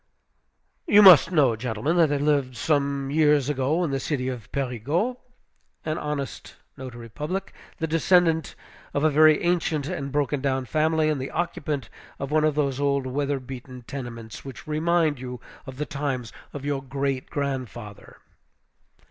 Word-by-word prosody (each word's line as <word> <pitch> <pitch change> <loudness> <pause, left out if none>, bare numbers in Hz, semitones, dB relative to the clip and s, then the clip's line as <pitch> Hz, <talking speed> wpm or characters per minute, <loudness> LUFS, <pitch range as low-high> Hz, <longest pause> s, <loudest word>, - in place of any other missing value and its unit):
You 210 0 +7
must 180 -3 +9
know, 140 -9 +4
gentlemen, 120 +7 -2
that 165 -3 +5
there 145 - +1
lived 140 -4 +1
some 140 -1 0
years 150 -2 +3
ago, 145 +5 +1
in 160 - -1
the 135 - -1
city 130 -3 -2
of 120 -6 -7
Périgueux, 140 - -1 0.7
an 155 0 -2
honest 150 -3 -5 0.2
notary 120 -3 -8
public, 155 - -4 0.2
the 160 - -1
descendant 165 0 +2 0.4
of 145 - +1
a 155 - +4
very 155 +2 +5
ancient 170 -4 +1
and 140 -6 -4
broken 145 0 0
down 135 -1 0
family, 155 +3 +1
and 150 -3 0
the 135 - -4
occupant 155 -5 -3 0.3
of 140 +1 -5
one 155 0 +3
of 155 -2 +1
those 140 -3 0
old 140 -1 +1
weather 140 +1 -1
beaten 130 -1 -9
tenements 115 -4 -7
which 135 -3 -9
remind 155 -1 +1
you 125 -1 -6 0.3
of 130 -1 -8
the 150 - -2
times 135 -5 -3 0.2
of 145 -1 -7
your 145 -2 -1
great 135 0 -3
grandfather. 130 -7 -5
140 Hz, 155 wpm, -25 LUFS, 130-155 Hz, 0.7 s, must